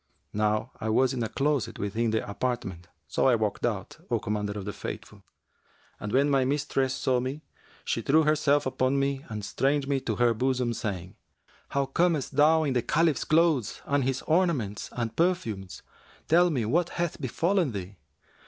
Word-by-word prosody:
Now 105 +3 0
I 110 - -1
was 130 +4 +3
in 125 - -3
a 110 - -1
closet 135 -4 0
within 110 +3 -1
the 110 0 -1
apartment; 100 -6 -3 0.2
so - - +1
I 125 - +5
walked 110 -2 -2
out, - - -4
O - - +2
Commander 105 -1 -2
of 100 -2 -6
the 105 - -4
Faithful, - - -8 0.8
and 105 - -5
when 140 +4 +3
my 135 -2 +3
mistress 135 -1 0
saw 130 -1 +1
me, 130 +4 -4 0.4
she - - -1
threw 155 +3 +4
herself 150 -1 +2
upon 130 +1 +1
me 140 0 0
and 105 -2 -5
strained 135 +4 0
me 140 -1 +1
to 115 -4 -2
her 120 0 +3
bosom 125 0 0
saying, 95 -5 -5 0.5
'How 140 0 0
camest 150 -1 0
thou 155 +2 +5
in 140 -3 0
the 125 - +2
Caliph's 160 +2 +1
clothes 155 -8 +2
and 140 -1 +1
his 130 0 -1
ornaments 155 - 0
and 115 -2 -3
perfumes? 115 - -1 0.4
Tell 175 +2 +5
me 130 -9 0
what 170 +10 +1
hath 170 -3 -2
befallen 165 - +1
thee.' 100 -2 -7
130 Hz, 175 wpm, -27 LUFS, 110-145 Hz, 0.8 s, I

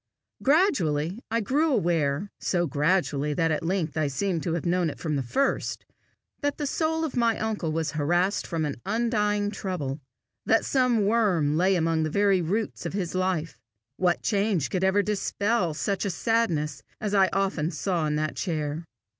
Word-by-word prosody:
Gradually 200 - +2
I 230 +1 +1
grew 295 +9 +1
aware 170 - +1
so 175 -2 0
gradually 150 -1 +1
that 165 0 +1
at 155 - 0
length 170 -2 -1
I 155 -2 +2
seemed 170 +4 -1
to 165 - -2
have 170 - -2
known 175 -1 +1
it - - -7
from 155 -3 -2
the 140 - 0
first 270 - -1 0.6
that 285 -1 -1
the 295 - -2
soul 320 +2 0
of 305 - -5
my 235 -2 +2
uncle 215 -7 -2
was 160 -1 -1
harassed 175 +8 0
with 165 -2 0
an 140 -5 -4
undying 210 -1 0
trouble, 155 -9 -4 0.4
that 225 - +3
some 250 -6 +2
worm 195 -9 +2
lay 185 +4 +3
among 165 -2 +1
the 155 - 0
very 200 +1 +3
roots 200 +7 -2
of - - -6
his 185 -4 -2
life. 185 -4 -1 0.4
What 180 -2 +1
change 200 - +1
could 185 -1 0
ever 190 +2 +3
dispel 205 -3 0
such 195 +3 -1
a 200 - 0
sadness 170 -9 0 0.2
as 210 -1 -3
I 195 -2 +5
often 190 -5 0
saw 175 -4 -1
in 150 - 0
that 155 0 -1
chair! 155 -2 -3
185 Hz, 175 wpm, -26 LUFS, 155-210 Hz, 0.6 s, I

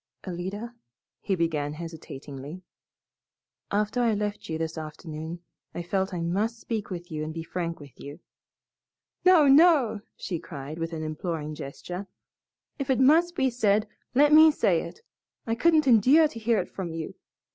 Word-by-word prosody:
"Alida," 195 +6 -5 0.5
he 195 - -1
began 155 -4 -1
hesitatingly, 150 -1 -8 1.1
"after 210 +4 0
I 230 -3 +2
left 205 -2 -4
you 160 - -2
this 160 0 -3 0.3
noon 160 +2 -6 0.3
I 175 - -3
felt 190 +2 -1
I 175 -2 -3
must 205 +8 -1
speak 220 -3 -4
with 175 -2 -7
and 155 0 -3
be 165 0 -5
frank 170 0 -4
with 145 -3 -14
you." 145 +1 -9 1.1
"No, 355 -6 +7
no!!" 275 - +5 0.2
she 175 -4 -4
cried, 150 -1 -8
with 165 +1 -3
an 160 -1 -4
imploring 155 -1 -4
gesture, 175 +7 -7 0.7
"if 275 - -3
it 260 - +2
must 330 +6 +4
be 265 -6 +1
said, 215 -2 +2 0.3
let 295 +3 +5
me 315 +1 +9
say 300 - +2
it. - - -9 0.4
I 225 - -1
couldn't 310 +5 +3
endure 260 +7 +6
to 230 - -9
hear 225 0 +2
it 180 - -2
from 175 -4 -5
you. 165 -1 -5
190 Hz, 155 wpm, -27 LUFS, 165-235 Hz, 1.1 s, me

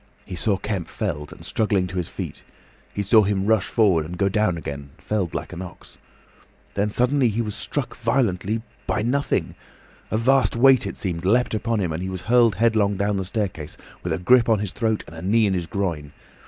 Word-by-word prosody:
He - - -8
saw 100 +3 0
Kemp 100 -3 -3
felled, 75 0 -4
and - - -12
struggling 105 -4 +1
to 90 +1 -6
his 90 - -2
feet. - - -6 0.5
He 100 - -2
saw 110 +3 +6
him 100 -1 0
rush 110 -2 +2
forward, 95 -8 +3
and 85 +3 -7
go 100 +1 +2
down 95 -3 +1
again, 70 -3 -6
felled 100 -6 -2
like - - -4
an 90 - -6
ox. 90 -2 -11 0.7
Then 100 +1 0
suddenly 125 +3 +2
he 115 +2 -1
was 105 -2 -4
struck 130 +1 -3
violently. 110 -3 0 0.2
By 105 - 0
nothing! 140 +5 0 0.6
A 110 - 0
vast 130 +3 +3
weight, 130 +2 +5
it - - -6
seemed, 85 -4 -3
leapt 115 +7 +2
upon 110 +1 0
him, 90 -4 -1
and 80 - -3
he 95 - -3
was 95 -1 -6
hurled 115 -1 +4
headlong 105 -2 +2
down 100 0 0
the 95 - -1
staircase, 95 -7 -4 0.2
with - - -3
a - - +1
grip 115 +6 +4
on 110 - +4
his 100 -2 -3
throat 110 -3 0
and 80 - -12
a 80 - -8
knee 110 +5 +3
in 100 - +1
his 90 -3 -2
groin. 80 -8 -3
100 Hz, 210 wpm, -23 LUFS, 90-115 Hz, 0.7 s, saw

